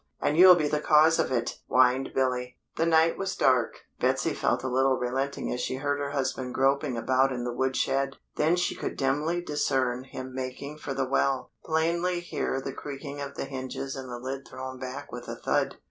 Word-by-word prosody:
And 150 Hz, -, +1 dB
you'll 180 Hz, +2 st, +9 dB
be 155 Hz, -4 st, +1 dB
the 150 Hz, 0 st, 0 dB
cause 155 Hz, +2 st, +5 dB
of -, -, +1 dB
it!" 120 Hz, -2 st, -1 dB
whined 130 Hz, +1 st, +3 dB
Billy. 125 Hz, -1 st, 0 dB, 0.2 s
The 165 Hz, -, +1 dB
night 165 Hz, 0 st, +4 dB
was 195 Hz, -1 st, -2 dB
dark. 130 Hz, -3 st, +2 dB, 0.2 s
Betsy -, -, +1 dB
felt -, -, 0 dB
a -, -, -1 dB
little 130 Hz, +1 st, +2 dB
relenting 135 Hz, +3 st, -2 dB
as 125 Hz, -, -3 dB
she 130 Hz, -, -2 dB
heard 145 Hz, +1 st, -1 dB
her 140 Hz, 0 st, -2 dB
husband 130 Hz, -2 st, -2 dB
groping 135 Hz, -1 st, +2 dB
about 130 Hz, +3 st, +2 dB
in 125 Hz, -2 st, -3 dB
the 120 Hz, 0 st, -3 dB
wood 130 Hz, +1 st, 0 dB
shed. 135 Hz, 0 st, 0 dB, 0.2 s
Then 160 Hz, +3 st, +3 dB
she 175 Hz, -, 0 dB
could -, -, -5 dB
dimly 150 Hz, +6 st, 0 dB
discern 130 Hz, -5 st, 0 dB
him 130 Hz, -1 st, -8 dB
making 130 Hz, +3 st, -5 dB
for 135 Hz, -3 st, -5 dB
the 135 Hz, 0 st, 0 dB
well; 135 Hz, 0 st, 0 dB
plainly 170 Hz, +3 st, +1 dB
hear 175 Hz, -5 st, -2 dB
the 135 Hz, 0 st, -5 dB
creaking 145 Hz, +1 st, -7 dB
of 140 Hz, 0 st, -6 dB
the -, -, -3 dB
hinges 135 Hz, 0 st, -5 dB
and 130 Hz, -1 st, -7 dB
the 120 Hz, -, -5 dB
lid 135 Hz, +2 st, -6 dB
thrown 130 Hz, 0 st, -7 dB
back 130 Hz, +1 st, -6 dB
with -, -, -7 dB
a -, -, -4 dB
thud. -, -, 0 dB
135 Hz, 205 wpm, -28 LUFS, 130-150 Hz, 0.2 s, you'll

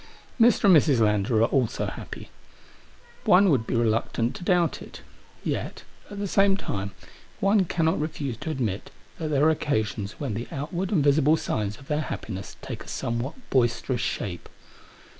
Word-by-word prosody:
Mi*, 230 Hz, -, +8 dB
and 240 Hz, -, +6 dB
Mrs. 155 Hz, -, +5 dB
Lander 110 Hz, +1 st, +2 dB
are 115 Hz, -, +2 dB
also 130 Hz, -5 st, 0 dB
happy* -, -, -8 dB, 0.9 s
One 185 Hz, +1 st, +6 dB
would 120 Hz, -6 st, +1 dB
be -, -, -1 dB
reluctant 115 Hz, +1 st, +1 dB
to 185 Hz, -, -9 dB
doubt 175 Hz, -2 st, +2 dB
it. -, -, -11 dB, 0.4 s
Yet, -, -, -3 dB, 0.3 s
at 205 Hz, -, -8 dB
the 200 Hz, 0 st, -2 dB
same 195 Hz, +1 st, +3 dB
time, 100 Hz, -, -4 dB, 0.5 s
one 195 Hz, 0 st, +3 dB
cannot 165 Hz, -2 st, +1 dB
refuse 145 Hz, -6 st, -3 dB
to 160 Hz, -, -6 dB
admit 115 Hz, -10 st, -2 dB, 0.3 s
that 160 Hz, -, -2 dB
there 145 Hz, -2 st, +2 dB
are 160 Hz, -, +6 dB
occasions 110 Hz, -8 st, -1 dB
when 140 Hz, -7 st, -4 dB
the 115 Hz, +4 st, -4 dB
outward 170 Hz, +7 st, -3 dB
and 165 Hz, -8 st, +3 dB
visible 145 Hz, +2 st, +4 dB
signs 105 Hz, -7 st, -2 dB
of 135 Hz, -, -16 dB
their 150 Hz, 0 st, 0 dB
happiness 100 Hz, -9 st, -6 dB
take -, -, -6 dB
a -, -, -18 dB
somewhat 120 Hz, +5 st, -3 dB, 0.2 s
boisterous 120 Hz, 0 st, +1 dB
shape. 90 Hz, -7 st, -4 dB
140 Hz, 165 wpm, -26 LUFS, 115-165 Hz, 0.9 s, Mi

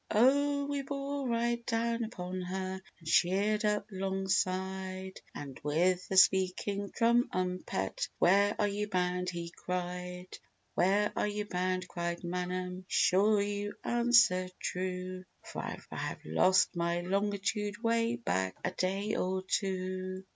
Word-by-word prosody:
Oh, 280 Hz, +5 st, +3 dB
we 285 Hz, 0 st, -2 dB
bore 275 Hz, 0 st, -3 dB
right 235 Hz, 0 st, 0 dB
down 230 Hz, 0 st, 0 dB
upon 185 Hz, -4 st, -5 dB
her, 190 Hz, +1 st, -4 dB, 0.2 s
And 165 Hz, -, -15 dB
sheered 200 Hz, +6 st, +3 dB
up 210 Hz, -1 st, +1 dB
'longside; 190 Hz, 0 st, -2 dB
And 140 Hz, -3 st, -7 dB
with 175 Hz, +5 st, +1 dB
a 190 Hz, -, 0 dB
speaking 190 Hz, +2 st, +3 dB
tru 235 Hz, +1 st, +3 dB
um 185 Hz, 0 st, -1 dB
pet, 95 Hz, -, -2 dB
"Where 200 Hz, +3 st, +4 dB
are 210 Hz, -, +2 dB
you 205 Hz, +1 st, -2 dB
bound?" 180 Hz, -1 st, 0 dB
he 170 Hz, -1 st, -5 dB
cried. 180 Hz, 0 st, -5 dB, 0.3 s
"Where 200 Hz, +3 st, +2 dB
are -, -, +1 dB
you 210 Hz, 0 st, -2 dB
bound," 185 Hz, -1 st, -1 dB
cried 170 Hz, 0 st, -3 dB
Manum, 180 Hz, +1 st, -3 dB
"Be 185 Hz, -, -15 dB
sure 200 Hz, +2 st, +4 dB
you 205 Hz, 0 st, -3 dB
answer 240 Hz, -6 st, +4 dB
true, 185 Hz, 0 st, -3 dB, 0.2 s
For -, -, -7 dB
I -, -, -5 dB, 0.2 s
have -, -, -4 dB
lost 185 Hz, -, +3 dB
my 170 Hz, 0 st, 0 dB
longitude 205 Hz, +3 st, -1 dB
Way 230 Hz, 0 st, +2 dB
back 95 Hz, -, -1 dB
a 180 Hz, -, 0 dB
day 195 Hz, +4 st, -1 dB
or 185 Hz, 0 st, -1 dB
two." 185 Hz, -1 st, -2 dB
190 Hz, 140 wpm, -32 LUFS, 180-210 Hz, 0.3 s, Where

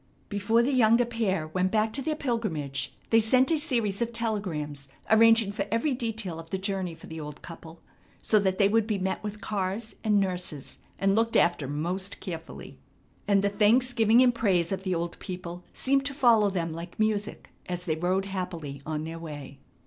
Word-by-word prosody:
Before 215 Hz, +3 st, +2 dB
the 275 Hz, +3 st, +1 dB
younger 235 Hz, -1 st, +5 dB
pair 210 Hz, -9 st, -1 dB
went 185 Hz, +3 st, 0 dB
back 220 Hz, 0 st, +1 dB
to 275 Hz, -, -1 dB
their 310 Hz, +3 st, -1 dB
pilgrimage 210 Hz, -, -2 dB, 0.2 s
they 225 Hz, -, +6 dB
sent 255 Hz, +6 st, +3 dB
a 320 Hz, -, +2 dB
series 235 Hz, -9 st, -1 dB
of 235 Hz, 0 st, 0 dB
telegrams 175 Hz, -12 st, -3 dB, 0.2 s
arranging 225 Hz, -1 st, +6 dB
for 205 Hz, -1 st, -3 dB
every 230 Hz, +6 st, +1 dB
detail 225 Hz, -8 st, -4 dB
of 165 Hz, 0 st, -10 dB
the 190 Hz, -, -1 dB
journey 190 Hz, -3 st, -3 dB
for -, -, -14 dB
the 160 Hz, 0 st, -7 dB
old 150 Hz, -1 st, -8 dB
couple, 165 Hz, -1 st, -11 dB, 0.4 s
so 215 Hz, -, +3 dB
that 190 Hz, -2 st, 0 dB
they 200 Hz, -, +5 dB
would 220 Hz, +1 st, +2 dB
be 215 Hz, -3 st, 0 dB
met 190 Hz, +1 st, -2 dB
with 210 Hz, 0 st, -6 dB
cars 200 Hz, +2 st, -3 dB
and 210 Hz, -2 st, +3 dB
nurses 180 Hz, -7 st, -3 dB, 0.2 s
and 195 Hz, 0 st, +2 dB
looked 225 Hz, +1 st, +1 dB
after 155 Hz, -5 st, +2 dB
most 175 Hz, +7 st, -3 dB
carefully. 165 Hz, -3 st, -8 dB, 0.5 s
And 200 Hz, -1 st, +3 dB
the 200 Hz, -, +3 dB
thanksgiving 230 Hz, +2 st, +4 dB
and 245 Hz, -1 st, +4 dB
praise 190 Hz, -7 st, +1 dB
of 190 Hz, -1 st, -2 dB
the 185 Hz, -2 st, -1 dB
old 170 Hz, 0 st, -3 dB
people 180 Hz, -1 st, -7 dB
seemed 275 Hz, +1 st, +1 dB
to 280 Hz, -, -5 dB
follow 230 Hz, -6 st, +5 dB
them 170 Hz, -4 st, -2 dB
like 170 Hz, +2 st, -8 dB
music 215 Hz, -1 st, -1 dB, 0.2 s
as 180 Hz, -1 st, -3 dB
they 160 Hz, -, +1 dB
rode 185 Hz, +4 st, 0 dB
happily 170 Hz, -7 st, -5 dB
on 155 Hz, -1 st, -2 dB
their 165 Hz, +1 st, -6 dB
way. 145 Hz, -4 st, -8 dB
195 Hz, 190 wpm, -27 LUFS, 170-225 Hz, 0.5 s, they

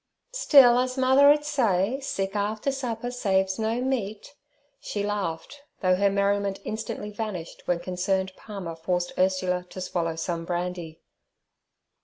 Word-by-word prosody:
'Still, 260 Hz, -, +6 dB
as 255 Hz, +1 st, -1 dB
mother 265 Hz, +2 st, +6 dB
'ud 295 Hz, 0 st, +2 dB
say, 240 Hz, -5 st, +1 dB
"Sick 195 Hz, -7 st, -3 dB
after 210 Hz, +6 st, -1 dB
supper 245 Hz, -3 st, -3 dB
saves 190 Hz, -4 st, 0 dB
no 225 Hz, +2 st, 0 dB
meat," 245 Hz, -2 st, -3 dB, 0.2 s
' 285 Hz, 0 st, -41 dB
she 205 Hz, -, -4 dB
laughed, 205 Hz, -, -3 dB, 0.2 s
though 185 Hz, -2 st, +3 dB
her 200 Hz, +2 st, +3 dB
merriment 200 Hz, 0 st, 0 dB
instantly 215 Hz, -1 st, -4 dB
vanished 205 Hz, -6 st, -5 dB
when 175 Hz, -, +1 dB
concerned 190 Hz, +2 st, -1 dB
Palmer 195 Hz, -6 st, -7 dB
forced 175 Hz, +2 st, -2 dB
Ursula 185 Hz, -1 st, +1 dB
to -, -, -8 dB
swallow 170 Hz, -3 st, -2 dB
some 165 Hz, +1 st, -3 dB
brandy. 175 Hz, -2 st, -4 dB
200 Hz, 140 wpm, -26 LUFS, 180-245 Hz, 0.2 s, Still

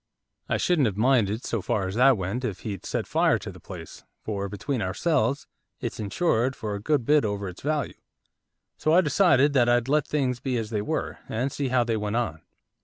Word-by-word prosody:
'I -, -, +2 dB
shouldn't 160 Hz, -8 st, +2 dB
have 100 Hz, -2 st, -3 dB
minded, 115 Hz, -2 st, +2 dB
so 115 Hz, -, -2 dB
far 95 Hz, 0 st, -1 dB
as 95 Hz, -, -4 dB
that 130 Hz, +2 st, +5 dB
went, 95 Hz, +7 st, -3 dB
if 105 Hz, -7 st, -3 dB
he'd 100 Hz, -4 st, -5 dB
set -, -, -2 dB
fire -, -, +2 dB
to -, -, -7 dB
the -, -, -13 dB
place, -, -, -10 dB, 0.2 s
for, 100 Hz, -2 st, -3 dB
between 115 Hz, +5 st, -3 dB
ourselves, 140 Hz, -, 0 dB, 0.3 s
it's -, -, -5 dB
insured 120 Hz, -, 0 dB
for 105 Hz, -2 st, -4 dB
a 100 Hz, -, -4 dB
good 145 Hz, 0 st, +1 dB
bit 150 Hz, +2 st, +4 dB
over 100 Hz, -1 st, -2 dB
its 90 Hz, 0 st, -9 dB
value. 145 Hz, -3 st, -1 dB, 0.8 s
So 155 Hz, -, +1 dB
I 180 Hz, -, +7 dB
decided 150 Hz, -4 st, +4 dB
that 120 Hz, -3 st, +4 dB
I'd 120 Hz, 0 st, +2 dB
let 150 Hz, +1 st, +2 dB
things 130 Hz, -5 st, 0 dB
be 130 Hz, -1 st, -1 dB
as 110 Hz, -1 st, -4 dB
they 105 Hz, -2 st, 0 dB
were, 105 Hz, -, -3 dB
and 125 Hz, +5 st, -1 dB
see 140 Hz, 0 st, -2 dB
how 125 Hz, -1 st, +2 dB
they 115 Hz, -1 st, -1 dB
went 105 Hz, 0 st, -2 dB
on. 95 Hz, -11 st, -1 dB
120 Hz, 210 wpm, -26 LUFS, 105-140 Hz, 0.8 s, I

